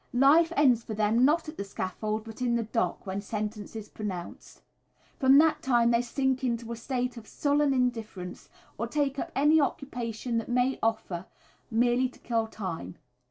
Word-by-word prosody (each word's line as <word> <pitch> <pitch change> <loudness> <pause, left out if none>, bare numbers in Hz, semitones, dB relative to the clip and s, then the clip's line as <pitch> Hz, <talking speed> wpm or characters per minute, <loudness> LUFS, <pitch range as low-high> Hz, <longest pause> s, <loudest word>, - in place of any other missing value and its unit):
Life 290 +7 +5
ends 250 -6 +4
for 220 - -5
them, 215 +3 +2
not 315 +3 +2
at 310 - -8
the - - -2
scaffold, 210 +2 -3
but 225 +2 -10
in 240 -1 +1
the 235 - +1
dock, 225 +1 -2
when 195 +1 -3
sentence 210 +1 -5
is 215 -1 -6
pronounced. 190 -6 -7 0.6
From 270 0 +6
that 315 +1 +4
time 240 -2 +3
they 235 0 +3
sink 265 +1 -1
into 235 -2 -2
a - - -3
state 250 +1 -3
of 220 -2 -10
sullen 290 0 +1
indifference, 225 -8 -2 0.3
or - - -1
take 285 -2 -1
up - - -4
any 300 +3 +5
occupation 240 -4 -2
that 230 - -7
may 250 +2 +1
offer, 195 -5 -1 0.4
merely 245 +2 +2
to - - -18
kill 230 -2 -1
time. 170 - -6
235 Hz, 175 wpm, -28 LUFS, 215-265 Hz, 0.6 s, From